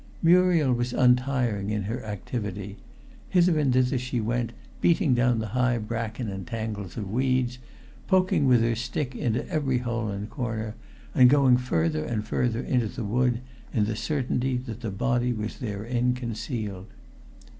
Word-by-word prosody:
Muriel 170 -5 +5
was 120 +1 -1
untiring 125 -5 +2
in 105 -1 -1
her 115 +5 -4
activity. 105 -1 -5 0.5
Hither 175 -3 +4
and 140 -3 +2
thither 130 +1 +2
she 125 0 -2
went, 115 +1 -1 0.3
beating 170 -5 +3
down 120 -1 +3
the 110 -1 -3
high 125 +1 +1
bracken 115 +1 -3
and 95 -3 -5
tangles 110 -4 -5
of 100 -4 -4
weeds, 125 0 +1 0.5
poking 185 -7 +3
with 125 -2 +5
her 115 0 +2
stick 125 +3 -3
into 120 -1 -1
every 140 -5 0
hole 120 -2 -2
and 100 0 -4
corner, 110 -3 -3 0.4
and 125 -1 +7
going 135 -2 +5
further 80 -11 0
and 110 +1 -2
further 120 +1 0
into 125 -4 +1
the 105 - -5
wood 120 +2 +1 0.3
in 105 - +2
the 110 +1 -2
certainty 130 -1 -1
that 125 -2 -6
the 115 - -3
body 120 +4 0
was 110 -1 -5
therein 120 +2 -1
concealed. 110 -5 -4
120 Hz, 155 wpm, -26 LUFS, 110-125 Hz, 0.5 s, and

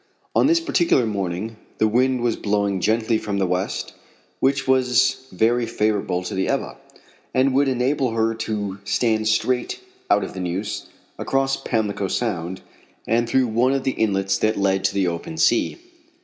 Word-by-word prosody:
On - - +4
this 335 +2 +4
particular 175 - +2
morning 100 +1 -3 0.2
the 110 - +3
wind 125 +3 +2
was 120 -2 +1
blowing 100 -2 0
gently 110 +2 +1
from 100 -1 -3
the 95 - +1
west, 90 +1 -2 0.5
which 135 0 +1
was 130 0 +2
very 115 +5 +2
favorable 105 -5 0
to - - -5
the 95 0 0
Ebba, - - -2 0.6
and 130 +1 +3
would 140 +1 +3
enable 130 +1 +1
her 115 0 +1
to 105 -3 -4
stand 110 0 +1
straight 125 +3 0 0.3
out - - +4
of - - -6
the 95 - -6
Neuse, 95 +4 -3 0.3
across 135 0 +1
Pamlico 105 -6 -1
Sound, 95 -4 -2 0.4
and 115 +1 +1
through 130 +1 +3
one 120 +3 +2
of 135 -1 -1
the 135 - +1
inlets 95 -4 0
that 110 0 +1
led 95 -1 +1
to - - +1
the 100 -1 +2
open 85 -1 -4
sea. 115 +8 +2
110 Hz, 165 wpm, -22 LUFS, 100-130 Hz, 0.6 s, On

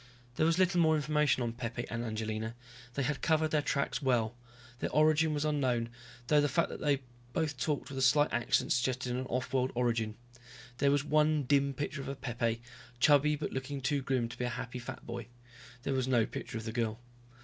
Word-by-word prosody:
There 155 - +3
was 165 0 +2
little 180 -1 +3
more 160 -1 +5
information 150 -4 +2
on 115 -1 -2
Pepe 120 0 -4
and 120 0 -3
Angelina, 110 0 -3 0.4
they 140 - 0
had 145 +1 -1
covered 155 -1 +2
their 150 - +3
tracks 140 -1 -1
well. 120 -4 +1 0.4
Their - - -1
origin 155 +2 +4
was 150 0 -1
unknown, 130 -6 +1 0.4
though 150 +3 +4
the 145 - +2
fact 170 +6 +1
they 145 -2 +1 0.3
both 150 -5 -1
talked 145 +1 -1
with 135 -1 -5
a - - -1
slight 145 +3 +4
accent 120 0 +1
suggested 125 0 0
an 130 +1 -3
off 125 +2 -2
world 130 0 +2
origin. 115 -3 0 0.6
There 140 - +4
was 140 0 +2
one 150 0 +3
dim 140 +1 +2
picture 145 +1 -3
of 135 0 -6
Pepe, 115 -2 -1 0.4
chubby 150 +2 +5
but - - -4
looking 135 +2 -3
too 140 +2 0
grim 130 -3 0
to - - -9
be 125 - 0
a - - -1
happy 125 +1 -5
fat 125 +1 -8
boy. 120 -1 -6 0.6
There 140 - -1
was 130 -1 0
no 120 -4 +3
picture 110 - -6
of 110 - -5
the 110 - -3
girl. 115 -1 -1
130 Hz, 205 wpm, -32 LUFS, 120-150 Hz, 0.6 s, more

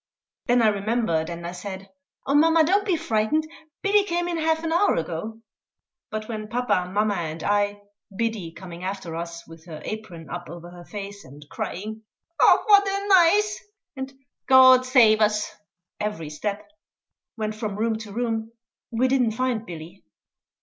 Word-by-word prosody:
Then 245 -1 +4
I 220 - +6
remembered, 205 -6 0
and 170 0 -6
I 170 - -4
said, 190 +1 -8 0.3
"Oh, 275 - 0
mamma, 320 +2 +5
don't 395 +6 +2
be 370 - +3
frightened; 310 +1 0 0.4
Billy 405 +1 +4
came 350 -2 -1
in 345 -1 -2
half 320 0 +1
an 325 0 -1
hour 385 +4 +3
ago." 175 +8 -4 0.7
But 215 0 -5
when 215 -2 -5
papa, 215 -6 0
mamma, 210 +1 +1
and 165 -3 -4
I 205 0 0 0.3
Biddy 225 -7 -2
coming 175 0 -10
after 190 -3 -4
us, 170 0 -6
with 165 +1 -14
her 155 -2 -8
apron 185 -7 -7
up 175 0 -7
over 175 0 -9
her 175 -1 -12
face, 200 0 -8
and 145 +3 -14
crying, 215 +4 -5 0.4
"Och, - - +5
what 405 -1 +6
a 395 +1 -2
nize!" 395 +3 +5 0.4
and 265 0 -5 0.4
"God 260 -1 +7
save 225 -4 +5
us!" 210 0 +1 0.5
every 185 -8 -4
step 205 +6 -4 0.7
went 215 -1 -2
from 215 -2 -4
room 220 0 0
to 220 -2 -9
room, 225 0 -2 0.4
we 240 +2 +1
didn't 250 -4 +2
find 235 -2 -1
Billy. 170 +2 -10
215 Hz, 165 wpm, -24 LUFS, 180-260 Hz, 0.7 s, God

